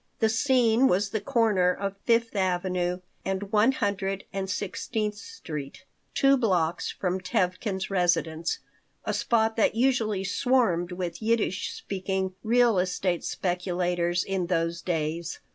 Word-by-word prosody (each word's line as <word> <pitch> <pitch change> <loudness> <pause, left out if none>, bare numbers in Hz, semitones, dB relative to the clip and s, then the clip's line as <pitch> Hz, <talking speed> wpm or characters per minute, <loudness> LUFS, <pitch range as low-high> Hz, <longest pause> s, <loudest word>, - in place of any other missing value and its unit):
The 220 - +2
scene 245 +1 +3
was 195 0 +1
the 220 - -1
corner 205 -5 +3
of 195 +1 -3
Fifth 230 -1 +2
Avenue 180 -1 0 0.2
and 195 +1 -3
One 220 +4 +5
Hundred 195 -4 -1
and 195 -1 -3
Sixteenth 210 +3 -2
Street, 165 - -8 0.3
two 275 0 +5
blocks 180 -8 +1
from 185 0 -2
Tevkin's 190 +2 -1
residence, 170 -3 +1 0.5
a 215 - -1
spot 220 +1 +1
that 220 - +3
usually 225 -5 +1
swarmed 195 -5 +1
with 175 0 -4
Yiddish 220 -3 0
speaking 190 -1 -3
real 235 -2 +3
estate 180 -1 0
speculators 180 -1 -1
in 190 -2 -2
those 170 -1 0
days. 165 0 -2
190 Hz, 125 wpm, -27 LUFS, 180-220 Hz, 0.5 s, One